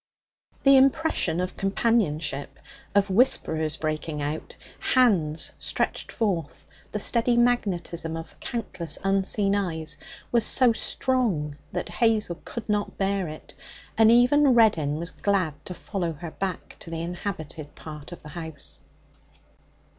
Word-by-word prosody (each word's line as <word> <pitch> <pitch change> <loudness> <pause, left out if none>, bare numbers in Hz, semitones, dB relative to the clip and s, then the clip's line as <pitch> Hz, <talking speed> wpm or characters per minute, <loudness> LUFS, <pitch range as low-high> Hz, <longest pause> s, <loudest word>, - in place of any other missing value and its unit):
The 275 0 +7
impression 270 - +2
of 180 0 -2
companionship 175 -9 0 0.4
of 200 -1 +3
whisperers 160 - +2
breaking 155 0 -3
out, 150 +2 -4 0.2
hands 185 -12 +2
stretched - - -2
forth, 185 - -2 0.3
the - - -2
steady 235 +3 +3
magnetism 175 -9 0
of 165 0 -10
countless 200 -8 -3
unseen 195 +1 +2
eyes 165 -6 -2 0.3
was 235 -2 +3
so 250 0 +4
strong 220 - 0 0.2
that 180 - -3
Hazel 210 -2 +1
could 235 - -7
not 210 -1 -1
bear 195 -2 0
it, 155 0 -10 0.4
and 220 0 +6
even 250 +3 +5
Reddin 165 -11 +4
was 170 +3 -4
glad 185 -7 -1
to 180 - -5
follow 175 -3 -3
her 160 +2 -8
back 190 -1 -5
to - - -8
the 165 0 -3
inhabited 165 -4 -6
part 150 0 -9
of 175 - -10
the 150 - -10
house. 160 -3 -3
185 Hz, 130 wpm, -26 LUFS, 160-225 Hz, 0.4 s, The